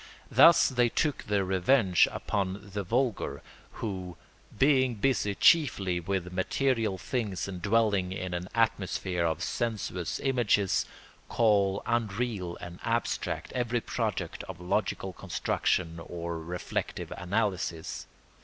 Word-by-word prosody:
Thus 170 - +7
they 120 -2 +2
took 150 +3 -1
their 100 -2 +1
revenge 95 +1 +4
upon 100 0 -3
the 100 - -1
vulgar 120 +4 -1 0.3
who, 95 -5 -5 0.4
being 130 -2 +4
busy 105 -3 +1
chiefly 100 - +4
with 90 0 -3
material 110 +2 0
things 100 -3 -3
and 90 -2 -6
dwelling 100 -3 +2
in 95 -1 -4
an 90 +1 -4
atmosphere 95 -5 0
of 80 0 0
sensuous 105 -7 -2
images, 120 -7 +2 0.4
call 100 -3 +2
unreal 110 -5 -1
and 85 0 -9
abstract 115 +1 -1
every 120 -1 0
product - - -3
of 95 -3 -8
logical 95 +1 -1
construction 85 -1 -1
or 85 -1 -5
reflective 90 +2 -4
analysis. 90 -4 -2
100 Hz, 115 wpm, -29 LUFS, 90-115 Hz, 0.4 s, Thus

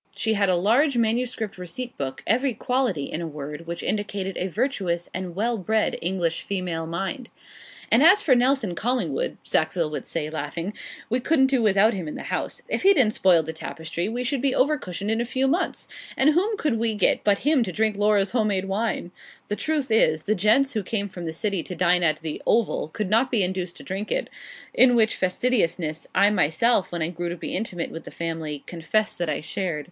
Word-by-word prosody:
She 220 - +1
had 200 -2 +2
a 185 - +4
large 240 - +3
manuscript 230 -3 -1
receipt 210 +8 -6
book 130 -1 -5
every 250 +3 +1
quality, 245 - 0
in 155 +4 -4
a 170 - -3
word, 150 +2 -7
which 170 0 -5
indicated 200 -2 -2
a 185 - -2
virtuous 190 -5 -2
and 185 -2 -5
well 230 +3 0
bred 220 +3 +1
English 170 -2 -1
female 180 -4 -3
mind. 195 - -4 0.6
'And 230 - +6
as 370 +6 +7
for 275 - +4
Nelson 250 -5 +2
Collingwood,' 250 - -1
Sackville 165 -5 0
would 150 - -5
say, 160 -2 -2
laughing, 165 +4 -4 0.4
'we 245 - +2
couldn't 265 +1 +3
do 255 - +3
without 215 +1 +4
him 180 -5 -4
in 150 - -5
the - - -5
house. - - -3
If - - -2
he 395 +1 +6
didn't 225 -7 +3
spoil 175 -4 +4
the 160 +1 -5
tapestry 160 +3 -4
we 245 +2 -3
should 260 +1 -1
be 275 -1 +1
'over 290 +4 +3
cushioned 200 - -4
in 225 +1 +1
a - - +1
few 260 +2 0
months; 335 +7 0 0.3
and 280 +3 +5
whom 400 +7 +1
could 270 - 0
we 225 -1 0
get 210 - +2
but 205 +3 +1
him 300 -4 +4
to 220 - -1
drink 215 +3 0
Laura's 205 -1 +2
home 225 -3 +1
made 195 -2 0
wine?' 195 -2 -2 0.4
The 210 - 0
truth 295 -1 -1
is, 155 -8 +3
the 215 - +1
gents 215 +8 +3
who 215 - 0
came 205 +1 -2
from 175 -2 -8
the 160 - -3
City 200 +1 -1
to 180 - -7
dine 180 0 +3
at 155 -2 +1
the 155 -2 -4
'Oval' 225 -8 +1
could 190 +5 -4
not 235 +4 +3
be 230 -6 +2
induced 180 -1 -3
to - - -11
drink 195 +3 -5
it - - -1 0.4
in 250 -1 +6
which 225 -2 +3
fastidiousness, 180 -6 0
I 200 +2 +5
myself, 195 +4 +2
when 170 -2 -2
I 160 - -1
grew 175 0 -4
to 175 - -5
be - - -4
intimate 180 -4 -3
with 165 - -8
the - - -7
family, 160 -3 -4
confess 210 +6 -1
that 175 -2 -3
I 150 - -1
shared. 170 0 -2
200 Hz, 215 wpm, -24 LUFS, 170-240 Hz, 0.6 s, as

